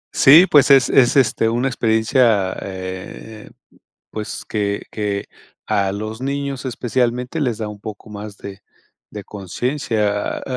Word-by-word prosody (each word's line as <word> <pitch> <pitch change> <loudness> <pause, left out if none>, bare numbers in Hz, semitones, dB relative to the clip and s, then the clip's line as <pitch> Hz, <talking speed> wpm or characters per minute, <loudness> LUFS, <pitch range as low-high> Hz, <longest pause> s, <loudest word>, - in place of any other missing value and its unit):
Sí, 155 +7 +8
pues 145 -1 +5
es 135 -2 +6
es, 125 -3 +4
este, 115 -4 +3
una 120 +3 0
experiencia, 110 -4 +2
eh, 95 +3 -8 0.6
pues 110 -1 -6
que 100 -2 -2
que 105 -2 -3 0.4
a 100 -1 0
los 110 +4 -6
niños 140 -1 -3
especialmente 125 +2 -2
les 120 -5 -1
da 110 -2 -4
un 105 - -9
poco 105 0 -9
más 105 0 -8
de 100 0 -9 0.5
de 105 -1 -7
consciencia. 105 0 -2
A - - -12
110 Hz, 135 wpm, -19 LUFS, 100-125 Hz, 0.6 s, Sí